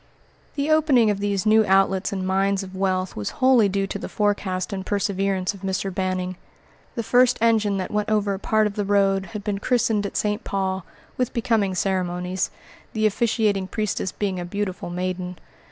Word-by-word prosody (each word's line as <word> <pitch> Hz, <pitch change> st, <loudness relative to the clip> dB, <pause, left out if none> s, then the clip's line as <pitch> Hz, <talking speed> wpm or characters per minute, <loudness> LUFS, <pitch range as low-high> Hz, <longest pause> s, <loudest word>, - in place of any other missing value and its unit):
The 290 Hz, +1 st, 0 dB
opening 280 Hz, -8 st, +4 dB
of 200 Hz, -, -2 dB
these 200 Hz, -1 st, -1 dB
new 220 Hz, +1 st, +5 dB
outlets 190 Hz, 0 st, +3 dB
and 190 Hz, -2 st, -3 dB
mines 195 Hz, +1 st, +1 dB
of 190 Hz, 0 st, -9 dB
wealth 185 Hz, -1 st, -1 dB
was 105 Hz, -, -3 dB
wholly 255 Hz, -5 st, +5 dB
due 195 Hz, 0 st, 0 dB
to 200 Hz, -, -5 dB
the -, -, -6 dB
forecast 205 Hz, -2 st, -1 dB
and 190 Hz, -1 st, -3 dB
perseverance 195 Hz, -1 st, 0 dB
of 195 Hz, -, -13 dB
Mr. 190 Hz, 0 st, -2 dB
Banning. 185 Hz, -1 st, -2 dB, 0.6 s
The 230 Hz, -, -2 dB
first 250 Hz, +2 st, +4 dB
engine 220 Hz, -3 st, +2 dB
that 185 Hz, -, -3 dB
went 210 Hz, 0 st, -1 dB
over 210 Hz, -2 st, +1 dB
a 190 Hz, -, -4 dB
part 215 Hz, +1 st, +2 dB
of 210 Hz, -, -1 dB
the 205 Hz, -, -2 dB
road 195 Hz, -1 st, +2 dB
had 210 Hz, -2 st, -7 dB
been 205 Hz, -2 st, -2 dB
christened 220 Hz, -3 st, +1 dB
at -, -, -5 dB
St. 210 Hz, +1 st, -1 dB
Paul, 190 Hz, -1 st, -2 dB, 0.3 s
with 250 Hz, -2 st, -1 dB
becoming 220 Hz, -5 st, +1 dB
ceremonies; 180 Hz, 0 st, -1 dB, 0.4 s
the 220 Hz, -1 st, +1 dB
officiating 210 Hz, -2 st, +1 dB
priestess 210 Hz, -2 st, -2 dB
being 195 Hz, -3 st, -2 dB
a -, -, -3 dB
beautiful 190 Hz, -1 st, -4 dB
maiden. 180 Hz, 0 st, -3 dB
200 Hz, 185 wpm, -23 LUFS, 190-215 Hz, 0.6 s, new